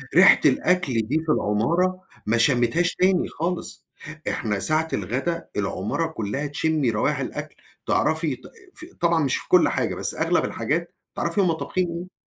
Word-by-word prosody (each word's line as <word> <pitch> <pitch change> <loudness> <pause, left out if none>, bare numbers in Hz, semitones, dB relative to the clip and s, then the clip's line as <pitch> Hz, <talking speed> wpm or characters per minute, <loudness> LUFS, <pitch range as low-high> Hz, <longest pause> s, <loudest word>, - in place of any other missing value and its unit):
ريحة - - +8
الأكل 180 -7 +2
دي 130 +9 -1
في 155 - +1
العمارة 170 - +1 0.2
ما 110 +2 +2
شمّيتهاش 130 +7 +2
تاني 185 -1 +2
خالص، 175 +2 -4 0.4
إحنا 105 -3 -2
ساعة 155 +7 +1
الغدا 130 - -2
العمارة 105 - -1
كلّها 140 0 -3
تشمّي 150 -2 0
روايح 110 0 0
الأكل، - - -5 0.3
تعرَفي 160 -3 +1
ط - - -21 0.3
ف 330 - -6 0.2
طبعًا 170 -2 +3
مش 135 - +1
في - - -9
كل 180 - +5
حاجة - - -1
بس - - -3
أغلب - - +1
الحاجات - - -2 0.2
تعرَفي 205 - 0
هُم 180 -3 +2
طابخين 180 +2 -2
إيه. 170 +2 -6
160 Hz, 155 wpm, -24 LUFS, 120-175 Hz, 0.4 s, ريحة